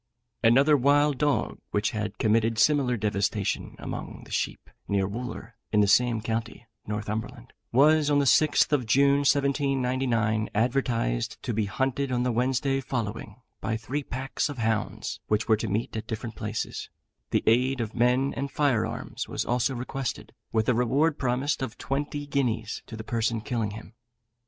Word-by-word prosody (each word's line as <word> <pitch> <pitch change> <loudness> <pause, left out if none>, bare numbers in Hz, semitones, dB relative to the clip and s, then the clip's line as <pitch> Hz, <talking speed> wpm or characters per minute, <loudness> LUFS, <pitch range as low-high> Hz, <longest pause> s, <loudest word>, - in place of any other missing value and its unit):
Another 135 +6 +6
wild 145 +1 +3
dog, 145 -2 0
which 105 +3 0
had 105 -2 -3
committed 115 +1 +2
similar 130 0 +3
devastation 100 -1 -1
among - - -6
the - - -15
sheep, - - -2 0.2
near 100 -1 +1
Wooler, 120 +1 -6 0.2
in 105 - +3
the - - +5
same 115 +2 +3
county 115 +1 -4 0.2
(Northumberland), 105 +1 -4 0.2
was, 150 +4 +5
on 145 - +3
the 140 - +3
6th 155 +5 +4
of 130 -6 +1
June, 140 +4 +4
1799, 130 -6 +1
advertised 115 - 0
to 120 - -2
be 110 0 0
hunted 130 +6 -1
on 125 -1 +1
the 125 - +1
Wednesday 130 +3 +1
following, 115 -2 -4 0.2
by 110 - -2
three 130 +6 -3
packs 135 +3 -3
of 145 - -6
hounds, 110 -2 -2
which 105 +1 0
were 110 - +4
to 110 - -3
meet 110 +4 -2
at 110 0 -4
different 110 0 -5
places; 105 0 -4 0.4
the - - +1
aid 125 +3 +3
of 110 -2 -3
men 125 +3 +2
and 140 +1 -3
fire 135 -8 +1
arms - - -5
was - - -3
also 125 +2 0
requested, 130 +1 -4 0.2
with 110 -1 +1
a 125 - +4
reward 135 +6 +2
promised 130 +3 0
of 130 -4 -4
twenty 145 +1 -3
guineas 125 -6 -1
to 110 - -8
the 110 - -6
person 115 0 0
killing 115 -1 -2
him. 105 +1 -10
120 Hz, 165 wpm, -27 LUFS, 110-135 Hz, 0.4 s, Another